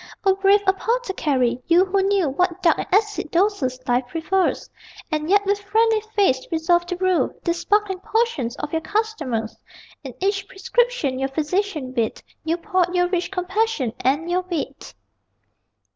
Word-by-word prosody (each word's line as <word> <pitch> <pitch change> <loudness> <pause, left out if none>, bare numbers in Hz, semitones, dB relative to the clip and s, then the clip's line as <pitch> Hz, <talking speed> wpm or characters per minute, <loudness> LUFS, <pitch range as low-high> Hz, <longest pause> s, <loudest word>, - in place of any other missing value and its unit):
O 385 - +5
brave 395 +1 +3
apothecary! 380 - 0
You 345 +3 +5
who 390 +1 +1
knew 390 -3 +2
What 360 +6 -1
dark 335 -3 +4
and - - -3
acid 415 -3 +1
doses 335 -9 0
life 245 0 +1
prefers 330 +6 0 0.4
And 310 +1 -1
yet 405 +1 +4
with 405 +1 +1
friendly 440 +2 +2
face 320 -11 +2
resolved 345 +2 +2
to 360 - -1
brew 370 0 +1
These 340 -1 -1
sparkling 405 0 +1
potions 375 - -1
for - - -3
your 325 - -1
customers 310 - -2 0.5
In 265 -4 -8
each 390 +1 -1
prescription 385 - 0
your 270 0 -1
Physician 310 -1 -2
writ 230 -3 -2 0.2
You 325 +1 0
poured 365 -1 0
your 355 0 +2
rich 360 -1 -1
compassion 375 - -1
and 290 +6 +1
your 355 +1 +1
wit! 315 -6 -5
360 Hz, 155 wpm, -22 LUFS, 300-400 Hz, 0.5 s, O